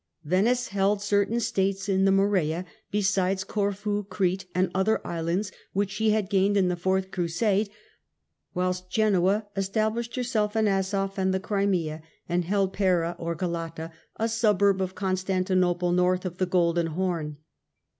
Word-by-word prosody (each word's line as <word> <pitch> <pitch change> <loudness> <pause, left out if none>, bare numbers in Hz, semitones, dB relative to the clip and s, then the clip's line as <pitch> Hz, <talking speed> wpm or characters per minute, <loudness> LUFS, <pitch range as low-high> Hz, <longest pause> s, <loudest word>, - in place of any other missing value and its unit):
Venice 215 +10 +1
held 200 +1 +1
certain 205 +3 +1
States 195 -4 0
in 195 -1 +2
the 195 - +4
Morea, 185 -4 +1 0.2
besides 190 -2 +1
Corfu, 205 0 -1
Crete 185 -1 -1
and 185 -1 +1
other 190 +4 +2
islands 170 +4 -2 0.2
which 200 0 0
she 220 +2 +1
had 215 -2 +1
gained 200 +1 +2
in 185 -2 +3
the 180 - 0
fourth 190 +2 -1
Crusade, 195 +4 0 0.9
whilst 180 0 -1
Genoa 205 0 +2
established 220 +4 -1
herself 225 -4 -1
in 220 -1 +3
Asof 195 0 0
and 190 0 +1
the - - 0
Crimea, 185 -6 -1 0.3
and 175 0 0
held 195 +1 +1
Pera 175 -3 +1
or 170 0 -3
Galata, 165 -1 -4 0.2
a 225 - 0
suburb 205 -4 +2
of 185 0 -3
Constantinople 185 -2 0
north 180 +1 +2
of 180 0 -5
the 185 - +1
Golden 170 -2 +2
Horn. 165 -3 -2
190 Hz, 145 wpm, -26 LUFS, 180-205 Hz, 0.9 s, the